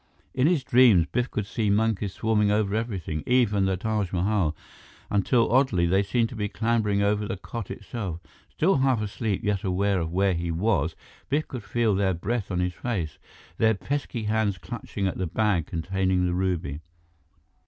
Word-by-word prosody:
In 135 +2 +3
his 165 -6 +2
dreams, 120 -10 +5
Biff 125 0 0
could 105 - -3
see 105 +1 -1
monkeys 105 -2 +1
swarming 105 -2 +1
over 105 -1 +1
everything, 100 -9 -2
even 115 -6 +3
the 95 -1 0
Taj 105 -2 -1
Mahal, 95 -3 +1 0.6
until 115 +4 +2
oddly, 120 -9 +3
they 95 +3 +3
seemed 115 +3 0
to 120 - -9
be 105 -2 -2
clambering 110 -3 +1
over 105 +1 +1
the 100 - -3
cot 115 +1 -7
itself. 95 -8 -5 0.3
Still 180 +2 +2
half 130 -3 +2
asleep, 105 -1 -2
yet 105 -2 0
aware 95 +1 +1
of 80 -1 -3
where 95 +2 +2
he 85 0 -2
was, 85 -2 0 0.3
Biff 150 +2 0
could 125 -5 -6
feel 110 +1 +1
their 95 -1 +1
breath 105 +4 -2
on 90 -2 -1
his 90 0 -1
face, 90 - -3 0.4
their 110 -1 +4
pesky 135 0 -3
hands 105 -2 0
clutching 100 +3 -5
at 95 - -2
the 95 - -1
bag 100 -2 +1
containing 95 +2 0
the 90 - 0
ruby. 90 -5 -1
100 Hz, 175 wpm, -26 LUFS, 95-115 Hz, 0.6 s, dreams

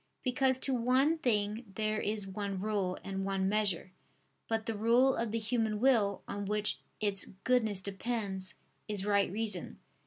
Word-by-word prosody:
Because 260 0 +2
to 265 +1 -1
one 260 +6 +3
thing 215 -3 +1
there 215 0 0
is 210 -1 -1
one 195 0 -3
rule 200 -3 -1
and 195 0 -3
one 195 -1 0
measure. 200 -3 +1 0.6
But 225 -1 -1
the 225 - -1
rule 235 +5 +4
of 230 -2 -1
the 230 - 0
human 220 -1 0
will, 225 -6 +3
on 205 0 -4
which 210 +1 -1 0.2
its 205 -3 0 0.2
goodness 220 -6 +2
depends, 195 -2 -3 0.3
is 205 -2 -1
right 200 -2 +3
reason. 210 -3 -1
210 Hz, 155 wpm, -32 LUFS, 200-230 Hz, 0.6 s, rule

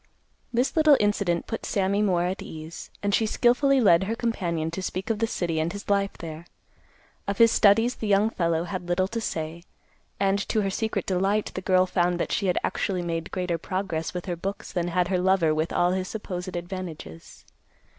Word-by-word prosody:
This 245 +3 0
little 310 -3 +6
incident 200 -5 +1
put 225 - -5
Sammy 200 +1 0
more 180 -4 +2
at 185 +2 -2
ease, 160 +1 -8
and 200 0 0
she 220 - +3
skilfully 260 +5 +3
led 190 -6 +5
her 225 +3 -2
companion 170 -9 -2
to 190 - -4
speak 185 +3 -3
of 215 - -2
the 225 - +1
city 170 -6 -1
and 160 +2 0
his 205 +1 -5
life 200 0 +1
there. 165 0 -8 0.8
Of 200 0 -1
his 230 +1 +6
studies 225 +4 +4
the 220 - -5
young 205 +2 +3
fellow 170 -4 0
had 180 0 -5
little 185 +2 +2
to 230 +1 -3
say, 160 -4 -4 0.6
and, 195 0 +2
to 220 - +2
her 195 - -1
secret 220 +3 -2
delight, 195 +3 0
the 185 - -4
girl 185 0 +3
found 180 -1 +1
that - - -2
she 195 - 0
had 180 - +1
actually 185 -3 -1
made 165 -1 -3
greater 180 -3 -2
progress 185 -3 -3
with 180 -1 -5
her 180 -3 -2
books 195 +4 -5
than 175 -1 -1
had 175 0 +1
her 185 -2 +1
lover 180 -4 +3
with 155 +2 -1
all 175 0 +2
his 185 0 -1
supposed 185 -4 -5
advantages. 170 - -8
185 Hz, 200 wpm, -26 LUFS, 170-205 Hz, 0.8 s, little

